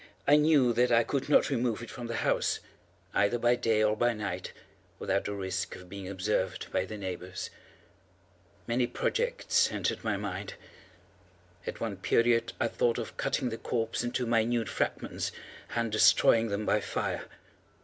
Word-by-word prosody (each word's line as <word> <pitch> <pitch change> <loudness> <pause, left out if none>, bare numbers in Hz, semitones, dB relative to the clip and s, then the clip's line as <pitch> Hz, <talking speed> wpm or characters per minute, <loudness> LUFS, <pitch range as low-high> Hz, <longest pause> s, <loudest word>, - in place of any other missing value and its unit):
I 145 - +7
knew 150 -5 +4
that 120 +1 +3
I 115 0 +5
could 140 +3 -2
not 145 - +4
remove 120 -3 0
it 115 - -8
from 120 +1 -6
the 115 - -3
house, - - +1 0.5
either 100 +4 +2
by 120 +1 +3
day 110 -3 +2
or 105 0 +3
by 120 +2 +2
night, 100 -4 -4 0.5
without - - -1
the 100 - -3
risk 95 -1 -3
of 90 -1 -12
being 95 -1 -7
observed 95 0 -2
by 95 - 0
the 105 +3 -7
neighbors. 95 -1 -5 1.1
Many 120 +1 +1
projects 475 - +1
entered - - -2
my 110 -3 0
mind. 100 -1 -5 1.1
At - - -4
one 110 -4 -2
period 115 +4 +2
I 120 - +2
thought 115 0 +1
of - - -5
cutting 125 - 0
the 115 - -5
corpse 115 0 -1
into 120 +1 -1
minute 115 0 +1
fragments, - - -2 0.4
and 115 -1 0
destroying 115 +1 +5
them 105 0 -2
by 105 - +3
fire. - - -2
115 Hz, 160 wpm, -30 LUFS, 100-120 Hz, 1.1 s, I